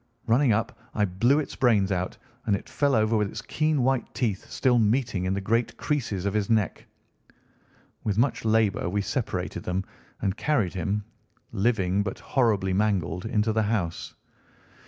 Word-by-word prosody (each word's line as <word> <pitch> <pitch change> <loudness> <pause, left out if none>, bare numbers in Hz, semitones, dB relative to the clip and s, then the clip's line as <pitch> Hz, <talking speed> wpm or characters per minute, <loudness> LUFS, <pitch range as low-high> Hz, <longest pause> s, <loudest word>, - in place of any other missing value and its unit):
Running 125 +2 +4
up, 115 +4 0 0.2
I 105 - +3
blew 115 +9 +2
its 155 - -2
brains 105 -6 +3
out, 90 -1 -2 0.3
and 100 - +3
it - - -7
fell 140 -2 +1
over 110 +1 +2
with 105 -2 +1
its - - -6
keen 155 -3 +1
white 130 -2 +1
teeth 110 -6 -2
still 125 -2 +2
meeting 110 -4 +1
in 95 +1 0
the - - -1
great 115 +4 0
creases 115 -10 -2
of 100 - 0
his 105 -2 0
neck. 110 -3 0 1.2
With 105 -2 -1
much 125 0 +1
labour 110 -4 +2
we 100 +2 -1
separated - - -3
them 90 +1 -2 0.4
and 95 0 -1
carried 110 - 0
him, 100 +3 -1 0.5
living 100 -3 +1
but 100 -1 -3
horribly 105 -7 +1
mangled, 95 -3 0
into 110 -1 +1
the 110 - +2
house. 100 -6 -2
105 Hz, 165 wpm, -26 LUFS, 95-120 Hz, 1.2 s, Running